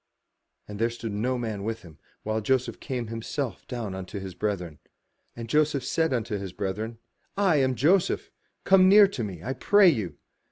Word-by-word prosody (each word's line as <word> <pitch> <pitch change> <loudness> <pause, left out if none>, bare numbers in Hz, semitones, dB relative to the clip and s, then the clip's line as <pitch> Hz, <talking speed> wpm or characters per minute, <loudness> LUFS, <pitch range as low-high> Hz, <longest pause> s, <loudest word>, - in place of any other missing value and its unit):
'* - - -52
And 105 0 -8
there 115 +1 +2
stood 115 -1 -6
no 120 +5 -1
man 110 -4 -4
with 115 +1 -4
him, 80 -4 -15 0.2
while 110 +1 -1
Joseph 130 +3 0
came 125 -4 -4
himself 115 0 -4
down 115 -6 -4
unto 95 +2 -6
his 95 -1 -7
brethren. 90 -6 -3 0.6
And 115 -1 -7
Joseph 150 0 +1
said 160 -1 +1
unto 115 -4 -1
his 95 -2 -6
brethren, 105 +5 -4 0.4
"I 190 -6 +3
am 130 -2 +2
Joseph; 170 - +2 0.3
come 190 -1 +6
near 205 +1 +8
to 125 -12 -4
me, 95 -6 -6
I 130 - -2
pray 205 +5 +5
you. 105 - -2
115 Hz, 185 wpm, -26 LUFS, 100-135 Hz, 0.6 s, near